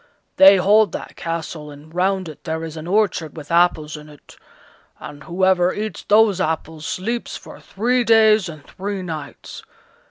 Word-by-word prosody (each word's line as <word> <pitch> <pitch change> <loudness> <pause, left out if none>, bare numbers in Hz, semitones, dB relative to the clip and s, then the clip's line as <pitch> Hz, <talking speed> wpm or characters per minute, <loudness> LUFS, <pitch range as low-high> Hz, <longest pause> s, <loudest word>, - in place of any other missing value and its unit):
They 195 +1 +8
hold 205 +1 +3
that - - -7
castle, 165 -2 -5
and 145 +2 -14
round 190 +1 0
it 155 - -11
there 160 0 -4
is 160 -1 -7
an 160 +1 -8
orchard 180 -6 0
with 150 0 -9
apples 170 -3 +2
in 150 0 -11
it, 145 -1 -17 0.6
and 145 -1 -10
whoever 185 +1 +1
eats 215 +1 -5
those 210 -3 +4
apples 160 -2 -3
sleeps 230 +6 -4
for - - -13
three 245 +5 -1
days 220 -4 +4
and 155 -3 -11
three 195 0 -5
nights. 160 -4 -8
175 Hz, 160 wpm, -20 LUFS, 155-205 Hz, 0.6 s, They